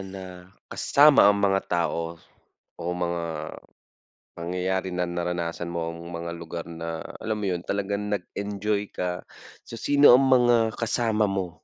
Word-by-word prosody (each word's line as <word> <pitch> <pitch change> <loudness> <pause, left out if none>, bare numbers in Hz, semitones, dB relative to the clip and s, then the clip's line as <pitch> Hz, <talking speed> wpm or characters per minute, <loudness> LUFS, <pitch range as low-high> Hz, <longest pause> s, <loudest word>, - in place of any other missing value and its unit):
na 95 -2 -9 0.2
kasama 145 -7 +6
ang 105 - +4
mga 95 -1 +3
tao 85 -1 -1 0.6
o - - -5
mga 85 -1 -2 1.1
pangyayari 90 +2 -2
na 90 0 0
naranasan 85 -1 -3
mo 85 -1 -3
ang 85 - -10
mga 85 0 -5
lugar 85 0 -6
na 85 -1 -6 0.2
alam 110 0 -2
mo - - -1
yun 90 -1 -2
talagang 100 +1 -2
nag-enjoy 100 +2 -3
ka? 90 0 -3 0.4
So - - -9
sino 145 +3 +6
ang 135 +2 +5
mga 120 -3 +4
kasama 110 -2 +1
mo? 95 -2 -2
95 Hz, 140 wpm, -25 LUFS, 85-105 Hz, 1.1 s, kasama